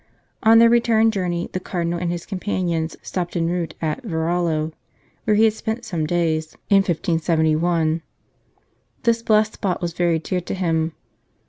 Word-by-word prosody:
On 225 Hz, +1 st, +6 dB
their 230 Hz, 0 st, +8 dB
return 230 Hz, -1 st, +4 dB
journey, 180 Hz, -4 st, -2 dB
the 185 Hz, -, -1 dB
Cardinal 175 Hz, -2 st, -2 dB
and 175 Hz, -1 st, -2 dB
his 175 Hz, -1 st, -4 dB
companions 180 Hz, -4 st, -2 dB
stopped 175 Hz, -1 st, -4 dB
en 165 Hz, -, +1 dB
route 170 Hz, -2 st, -2 dB
at 160 Hz, +10 st, -1 dB
Varallo, 160 Hz, -4 st, -1 dB, 0.5 s
where 215 Hz, -, +3 dB
he 215 Hz, -, +4 dB
had 220 Hz, -1 st, +4 dB
spent 220 Hz, +2 st, -4 dB
some 160 Hz, -4 st, -2 dB
days 160 Hz, -2 st, 0 dB, 0.2 s
in 200 Hz, -, +7 dB
1571. 165 Hz, -2 st, +1 dB, 1.0 s
This 230 Hz, -1 st, +2 dB
blessed 215 Hz, -1 st, +3 dB
spot 190 Hz, -4 st, -2 dB
was 175 Hz, -2 st, -3 dB
very 170 Hz, -1 st, +1 dB
dear 180 Hz, +3 st, -2 dB
to -, -, -5 dB
him. 165 Hz, -3 st, 0 dB
175 Hz, 155 wpm, -22 LUFS, 165-205 Hz, 1.0 s, their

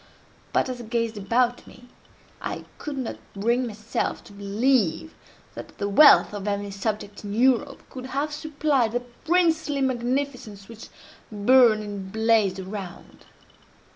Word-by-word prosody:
But -, -, +1 dB
as 250 Hz, -1 st, -5 dB
I -, -, -9 dB
gazed 230 Hz, 0 st, -1 dB
about 240 Hz, +4 st, 0 dB
me, 245 Hz, 0 st, -15 dB, 0.5 s
I -, -, -5 dB
could 295 Hz, -2 st, -5 dB
not 255 Hz, -3 st, -4 dB, 0.2 s
bring 235 Hz, +5 st, +1 dB
myself 215 Hz, 0 st, -3 dB
to 205 Hz, -, -15 dB
believe 205 Hz, -, 0 dB, 0.4 s
that -, -, -10 dB
the 200 Hz, -, -2 dB
wealth 210 Hz, +2 st, +7 dB
of 205 Hz, -1 st, -5 dB
any 200 Hz, 0 st, -2 dB
subject 205 Hz, +1 st, -4 dB
in 205 Hz, 0 st, -5 dB
Europe 265 Hz, +3 st, +1 dB
could 255 Hz, -1 st, -8 dB
have 285 Hz, +3 st, -2 dB
supplied 290 Hz, -6 st, 0 dB
the 245 Hz, -, 0 dB
princely 315 Hz, +3 st, 0 dB
magnificence 250 Hz, -5 st, -2 dB
which 230 Hz, 0 st, -11 dB, 0.4 s
burned 220 Hz, +1 st, +5 dB
and 200 Hz, -2 st, -7 dB
blazed 220 Hz, -3 st, +2 dB
around. 190 Hz, -1 st, -8 dB
235 Hz, 140 wpm, -25 LUFS, 205-260 Hz, 0.5 s, wealth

